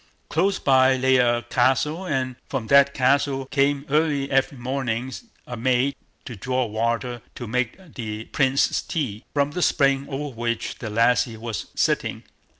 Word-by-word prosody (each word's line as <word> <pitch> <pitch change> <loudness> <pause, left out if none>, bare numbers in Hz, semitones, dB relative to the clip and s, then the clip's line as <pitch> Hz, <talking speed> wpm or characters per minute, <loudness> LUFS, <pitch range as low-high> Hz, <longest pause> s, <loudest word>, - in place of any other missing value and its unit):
Close 190 +5 +1
by 130 -1 +4
lay 130 0 +3
a 120 -1 +2
castle, 145 +8 +1
and 130 -4 -1
from 130 -5 -3
that 140 +3 +5
castle 135 0 +1
came 140 +1 +1
early 145 -2 +1
every 135 +1 +1
morning 125 0 -3 0.3
a 125 - -6
maid 130 +3 +1 0.3
to 120 - -7
draw 125 +4 -1
water 115 +2 -2
to 120 - -6
make 125 +1 -1 0.2
the 110 -3 -5
Prince's 135 -1 +1
tea, 125 -9 -3
from 140 0 +2
the 180 - -3
spring 140 -4 +2
over 140 0 -4
which 115 0 -3
the 110 - -5
lassie 115 +1 +2
was 115 -1 -5
sitting. - - 0
130 Hz, 155 wpm, -23 LUFS, 120-140 Hz, 0.3 s, that